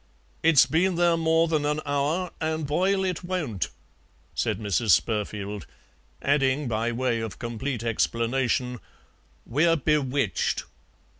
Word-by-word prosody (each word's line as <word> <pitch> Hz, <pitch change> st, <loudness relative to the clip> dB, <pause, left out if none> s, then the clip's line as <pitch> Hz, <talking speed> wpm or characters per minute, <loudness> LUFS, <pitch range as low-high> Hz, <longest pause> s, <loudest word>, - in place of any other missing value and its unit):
"It's 160 Hz, -6 st, +6 dB
been 170 Hz, +7 st, +1 dB
there 170 Hz, 0 st, +3 dB
more 165 Hz, 0 st, +3 dB
than 155 Hz, -2 st, 0 dB
an 150 Hz, +1 st, 0 dB
hour, 145 Hz, +5 st, 0 dB
an' 160 Hz, 0 st, -1 dB
boil 190 Hz, +7 st, +1 dB
it 185 Hz, -1 st, -2 dB
won't," 160 Hz, -, -2 dB, 0.6 s
said -, -, -1 dB
Mrs. 105 Hz, -1 st, +3 dB
Spurfield, 105 Hz, -2 st, -4 dB, 0.6 s
adding, 140 Hz, 0 st, +2 dB
by 115 Hz, +1 st, 0 dB
way 120 Hz, -1 st, 0 dB
of 110 Hz, -2 st, -5 dB
complete 120 Hz, +1 st, -4 dB
explanation, 120 Hz, +2 st, 0 dB, 0.7 s
"we're 160 Hz, +7 st, +3 dB
bewitched." 140 Hz, -6 st, 0 dB
140 Hz, 120 wpm, -26 LUFS, 115-160 Hz, 0.7 s, It's